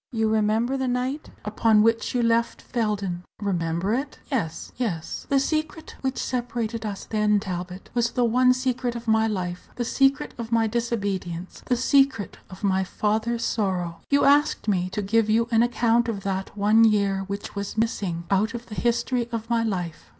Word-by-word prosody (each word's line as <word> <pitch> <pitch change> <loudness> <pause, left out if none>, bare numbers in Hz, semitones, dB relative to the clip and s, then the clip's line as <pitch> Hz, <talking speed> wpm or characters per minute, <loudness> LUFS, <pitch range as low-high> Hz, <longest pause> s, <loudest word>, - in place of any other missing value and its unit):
You 225 -2 +1
remember 220 +4 +1
the 265 -1 -1
night 255 +4 -2 0.2
upon 210 0 +3
which 230 +2 +1
you 245 - +2
left 230 0 +1
Felden?" 205 -6 -2 0.2
"Remember 180 -1 -1
it? 270 +5 -2
Yes, 170 - -2
yes." 195 -10 -3
"The 275 - +4
secret 310 +2 -2
which 265 0 -2
separated 235 -3 -2
us 200 -2 -5
then, 210 -1 +2
Talbot, 185 -2 -6
was 235 -1 +2
the 245 0 +1
one 250 +2 +4
secret 255 -1 -1
of 235 0 -7
my 220 0 +3
life 180 -4 -4
the 240 - -2
secret 270 +3 +2
of 230 0 -5
my 230 -1 +3
disobedience, 200 -6 -3
the 250 - +3
secret 270 -4 +2
of 185 +2 -12
my 190 -1 +2
father's 220 +4 -1
sorrow. 180 -6 -1
You 280 0 +4
asked 290 -3 +3
me 185 -3 +1
to 205 +2 -3
give 220 +2 +2
you 230 +2 +3
an 225 0 +4
account 235 0 +2
of 200 -4 -4
that 195 +1 -3
one 210 +3 +5
year 200 -3 +3
which 200 0 -5
was 200 +1 -5
missing 195 -6 -1
out 215 +4 +2
of 235 0 -6
the 220 - -10
history 240 +1 0
of 230 0 -4
my 230 -1 +3
life. 180 -7 -3
225 Hz, 180 wpm, -25 LUFS, 200-240 Hz, 0.2 s, one